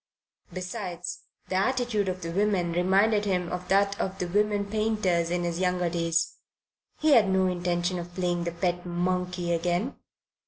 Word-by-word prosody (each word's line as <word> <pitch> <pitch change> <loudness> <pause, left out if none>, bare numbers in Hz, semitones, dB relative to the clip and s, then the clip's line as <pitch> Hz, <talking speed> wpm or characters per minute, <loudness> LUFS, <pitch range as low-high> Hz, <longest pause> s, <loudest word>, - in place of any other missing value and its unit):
Besides, 180 -1 -5 0.2
the 185 - 0
attitude 230 -2 +1
of 185 -1 -4
the 165 - -3
women 190 -2 +1
reminded 195 +4 +3
him 180 -3 0
of 180 0 -4
that 200 +1 +2
of 190 0 -2
the 180 - -2
women 205 +2 +1
painters 200 -5 0
in 175 0 0
his 170 0 -2
younger 180 -2 +1
days. 165 0 0 0.6
He 310 0 +3
had 225 -8 +6
no 190 0 +3
intention 175 0 0
of 175 0 -8
playing 175 -2 0
the 170 - -1
pet 175 +1 -1
monkey 180 0 -1
again. 175 +8 0
180 Hz, 160 wpm, -27 LUFS, 175-200 Hz, 0.6 s, had